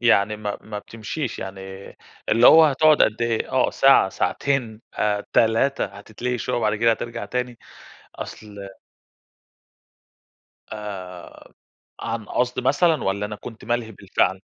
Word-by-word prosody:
يعني 105 -3 +3
ما 105 -1 -4
ما 105 -1 -7
بتمشيش 115 +5 -5
يعني، 95 0 -7 0.7
اللي 115 +3 +5
هو 160 0 +9
هتقعد 155 +1 +4
قد 110 +2 +1
إيه؟ 115 -1 -1
آه 130 -1 +2
ساعة 135 -7 +5
ساعتين، 120 0 -1 0.5
3، 115 +5 +2
هتتلهي 110 +5 -5
شوية، - - -2
وبعد 110 -2 +1
كده 115 +2 +3
هترجع 115 +1 -3
تاني، 125 -1 -4 0.6
أصل 100 -2 -9 2.0
آآ، 95 -4 -9 0.5
عن 115 -2 -4
قصد 125 +3 -1
مثلًا 150 +3 +2
والَّا 100 +2 -1
أنا 105 0 -7
كنت 115 +2 -10
مَلهي 120 0 -2
بالفعل؟ - - 0
115 Hz, 125 wpm, -23 LUFS, 105-125 Hz, 2.0 s, هو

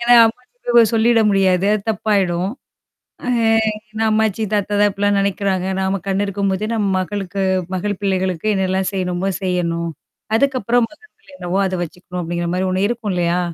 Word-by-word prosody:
ஏன்னா 240 +1 +5
அம்மாச்சிட்ட 250 - -6
போயி 230 -2 +7
சொல்லிட 230 +1 +4
முடியாது. 190 -1 +2
அது 210 - -2
தப்பாயிடும். 195 -4 0 0.8
அ - - -4 0.6
ஏன்னா 220 +1 -2
அம்மாச்சி, 220 0 +1
தாத்தா 205 0 0
தான் 205 0 +5
இப்பிடிலாம் 205 0 +1
நெனைக்கிறாங்க. 195 -1 0
நாம 190 +1 0
கண்ணு 195 +1 +1
இருக்கும்போதே 200 +1 -1
நம்ம 210 -3 0
மகளுக்கு 195 0 -3 0.3
மகள் 205 +1 -2
பிள்ளைகளுக்கு 190 0 0
என்னால்லாம் 190 0 0
செய்யணுமோ, 185 0 -1
செய்யணும். 170 -2 -1 0.5
அதுக்கப்புறம் 245 -2 +2
மகன் 430 +8 -19
பிள்ளை 445 - -21
என்னவோ 180 -1 -2
அத 185 -1 -1
வச்சுக்கணும் 180 +2 -7
அப்படிங்கிற 170 +1 -2
மாரி 185 +1 0
ஒண்ணு 190 +2 +1
இருக்கும் 225 -5 -2
இல்லையா? 175 0 +1
195 Hz, 155 wpm, -19 LUFS, 185-215 Hz, 0.8 s, போயி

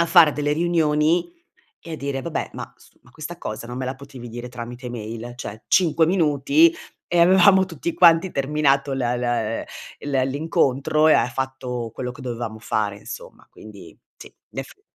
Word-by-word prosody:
a 170 - +3
fare 165 -3 +7
delle 145 0 -1
riunioni 165 - +1 0.5
e 165 - -9
a - - -2
dire: 140 -2 -4
"Vabbè, 165 +3 -3
ma - - -8
s - - -23
ma 125 - -22
questa 160 +4 -8
cosa 110 -4 -6
non 120 +1 -7
me 130 - -3
la 130 +1 -3
potevi 135 -2 -11
dire 120 +1 -7
tramite 120 +1 -7
mail?", 115 0 -6
cioè, 110 -3 -8
5 165 -3 +4
minuti 160 -2 +3 0.3
e 175 - 0
avevamo 190 +2 +6
tutti 170 -1 -4
quanti 170 +1 +5
terminato 140 0 +1
l - - -2
l - - -2 0.2
ehm, 115 -2 -1 0.4
l 145 -1 -5
ehm, 130 0 +2
l'incontro 145 +1 +1
e 155 - +7
ha - - +3
fatto 125 -3 -4
quello 125 -1 -4
che 125 - -13
dovevamo 120 -3 -5
fare, 105 -2 -2
insomma, - - -10
quindi, - - -13 0.2
sì, - - -11 0.2
in - - -5
effetti 405 - -10
140 Hz, 185 wpm, -22 LUFS, 125-165 Hz, 0.5 s, fare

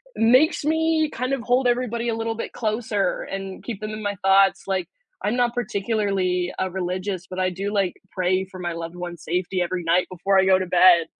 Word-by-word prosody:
makes 255 +9 +4
me 320 0 +2
kind 255 +3 -2
of 270 - -1
hold 250 +1 +2
everybody 240 -1 0
a 225 - 0
little 225 0 -2
bit 230 - -6
closer 215 -2 -1
and 195 -1 -6
keep 220 -4 -6
them 215 0 -4
in 215 0 -6
my 205 0 -1
thoughts. 195 0 +4
Like, 185 -3 -1 0.4
I'm 210 +4 0
not 245 -1 +1
particularly, 200 -6 -1
uh, 190 - 0
religious, 185 0 -3
but 185 - -5
I 185 0 +2
do 195 +3 -4
like 195 -3 +1 0.2
pray 185 +1 0
for 185 0 -12
my 175 -1 -3
loved 165 +1 -6
ones' 175 -2 -7
safety 180 +2 -1
every 175 0 -2
night 170 +2 +2
before 190 +2 +1
I 190 - +4
go 190 0 +5
to 185 - -2
bed. 175 -2 +6
195 Hz, 210 wpm, -23 LUFS, 185-230 Hz, 0.4 s, bed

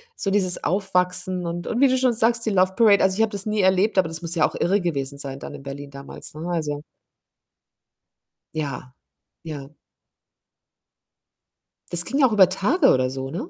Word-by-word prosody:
so 195 - -2
dieses 185 -3 +2
Aufwachsen 180 -1 -1
und 170 +1 -5
und 240 +3 -1
wie 275 - +6
du 260 - +2
schon 255 -2 +2
sagst, 230 +1 +2
die 220 - 0
Love 185 0 +2
Parade. 210 -5 +5
Also, 190 +1 +2
ich - - +2
habe 225 0 +2
das 200 0 -3
nie 215 0 -1
erlebt, 190 +3 +2
aber 185 -3 +4
das 165 +1 -6
muss 170 +1 -2
ja 160 - +3
auch - - -12
irre 195 +4 +1
gewesen 140 -5 -3
sein 135 -1 -4
dann - - -8
in 135 - -10
Berlin 140 +1 -8
damals, 140 0 -6
ne? 155 +3 -7
Also 150 -4 -3 1.7
Ja, 140 -4 -5 0.5
ja. 145 -4 -7 2.2
Das 175 0 +2
ging 275 - -2
ja 265 - +6
auch 235 - -4
über 195 -4 +5
Tage 210 - +2
oder 130 0 +1
so, 135 0 -5
ne? 235 - -5
180 Hz, 190 wpm, -23 LUFS, 150-210 Hz, 2.2 s, wie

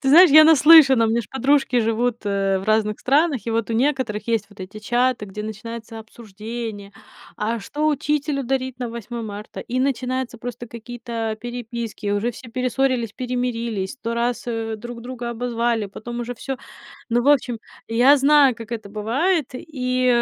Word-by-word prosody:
Ты 270 - +1
знаешь, 345 +1 +8
я 310 +1 +9
наслышана, 300 -6 +7
у - - 0
меня 235 +1 +1
ж - - -13
подружки 265 -2 +2
живут, 230 +2 0
э, 195 -1 +1
в - - -8
разных 215 0 +1
странах, 285 -2 +2
и 230 - -1
вот 230 0 -1
у - - 0
некоторых 240 -4 0
есть 225 -3 0
вот 205 -1 -16
эти 190 +3 -8
чаты, 240 +1 0
где 210 +2 -7
начинается 225 +1 -7
обсуждение: 220 -1 -8 0.4
"А 225 +2 -1
что 295 +9 -2
учителю 290 -1 -1
дарить 260 0 -2
на 245 - -3
Восьмое 235 0 -6
марта?" 210 -1 -8
И 255 +2 -3
начинаются 255 -2 -2
просто 240 0 -7
какие-то, 235 -1 -5
а, - - -6
переписки, 235 -2 -5
уже 205 +4 0
все 245 +1 -12
перессорились, 255 -1 0
перемирились, 235 -5 -3
сто 235 -4 -4
раз, 235 +1 -1
э, 225 -2 -3
друг 235 +2 -8
друга 245 -1 -5
обозвали, 235 -2 -1
потом 240 +4 -7
уже 240 +1 -4
всё. 265 +3 -5 0.5
Ну, 240 +1 +2
в 255 - -2
общем, 250 -5 +2 0.3
и 225 - -5
я 270 +4 +7
знаю, 280 -2 +5
как 230 0 -10
это 220 -3 -5
бывает, 255 - 0
и, 255 -2 -2
240 Hz, 180 wpm, -22 LUFS, 225-255 Hz, 0.5 s, я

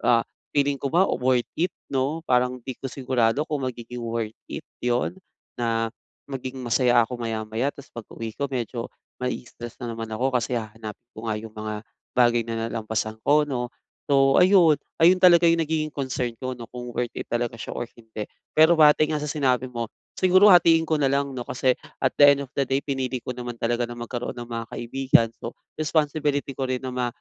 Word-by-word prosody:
ah, 115 -1 +4 0.3
feeling 140 -1 +2
ko 140 - -1
ba 175 +7 +4
worth 125 -7 +1
it, 180 +2 +2 0.2
'no? 140 +5 -1
Parang 125 -1 +2
'di 130 - -4
ko 135 - -4
sigurado 130 +1 +1
kung 140 -5 -2
magiging 120 0 -7
worth 115 -2 -3
it - - -6 0.2
yun 120 0 0 0.4
na 115 -1 0 0.4
maging 130 -1 -6
masaya 120 0 +3
ako 125 - -6
maya-maya 115 +2 -2
tapos 140 -1 -13
pag-uwi 115 -1 -7
ko 140 -1 -3
medyo 120 -2 -3 0.3
maii-stress 120 -2 -5
na 120 -3 -5
naman 115 -1 -6
ako 125 +4 -1
kasi 120 0 +1
hahanapin 110 +1 -8
ko 110 0 -5
nga 110 - -1
yung 110 0 -10
mga 110 0 -4 0.4
bagay 120 -1 +3
na 115 0 -3
nalampasan 110 -1 -2
ko, 150 +1 +4
'no? 125 -3 -3 0.4
So, 135 -1 +5
ayun 180 -5 +6 0.2
ayun 170 +3 +6
talaga 175 -1 +7
yung 165 0 +3
nagiging 155 -1 -2
concern 130 -3 -2
ko, 130 -1 -4
'no, 115 - -8
kung 125 0 -6
worth 120 0 -3
it - - -6
talaga 120 0 -1
siya 115 - -7
or 120 - -3
hindi, 110 -2 -8 0.2
pero 160 +2 +6
batay 155 -1 +6
nga 150 - -2
sa 150 - -3
sinabi 130 -4 +1
mo, 115 -1 -3 0.3
siguro 185 +2 +6
hatiin 165 -2 +6
ko 160 -1 0
na 140 - +2
lang, 140 +1 +1
'no, 125 -2 -6
kasi 130 0 +1 0.2
at 130 - +4
the 145 -1 +9
end 140 - -5
of 135 - -10
the 140 - +2
day 135 +2 0
pinili 130 -3 -2
ko - - -5
naman 120 -1 -5
talaga 120 +1 -1
na 120 - -7
magkaroon 120 0 -5
ng 120 -1 -8
mga 115 -1 -4
kaibigan. 120 -1 +2
So, 115 - -6 0.2
responsibility 150 -2 0
ko 135 0 -3
rin 130 0 -2
na 130 - -4
ma 125 -1 -1
125 Hz, 200 wpm, -25 LUFS, 115-140 Hz, 0.4 s, the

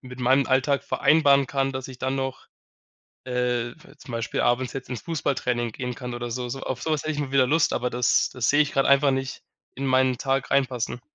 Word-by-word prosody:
mit 125 -1 -11
meinem 130 +2 +3
Alltag 135 +2 +2
vereinbaren 140 -3 +3
kann, 135 +1 0
dass 130 -1 -5
ich 130 -2 -11
dann 130 +1 -1
noch, 135 0 -4 0.8
äh, 125 -1 -1 0.3
zum 125 - -11
Beispiel 115 0 -2
abends 120 0 +1
jetzt 135 -1 -7
ins 125 -4 -5
Fußballtraining 130 -7 -1
gehen 125 +1 -4
kann 125 0 -6
oder 120 0 -5
so 125 +1 -3
so. 135 +2 -6
Auf 130 -1 -4
sowas 155 -3 -1
hätte 155 - -2
ich 145 - -5
mal 140 -2 -3
wieder 135 -2 +4
Lust, 155 +4 +2
aber 125 0 -1
das 125 +1 +2
das 125 -2 -1
sehe 145 +1 +5
ich 145 - -4
grad 135 - +2
einfach 140 +1 +5
nicht 135 0 -3 0.3
in 135 - -5
meinen 130 -1 +3
Tag 135 0 -1
reinpassen. 130 -3 0
130 Hz, 215 wpm, -25 LUFS, 125-140 Hz, 0.8 s, sehe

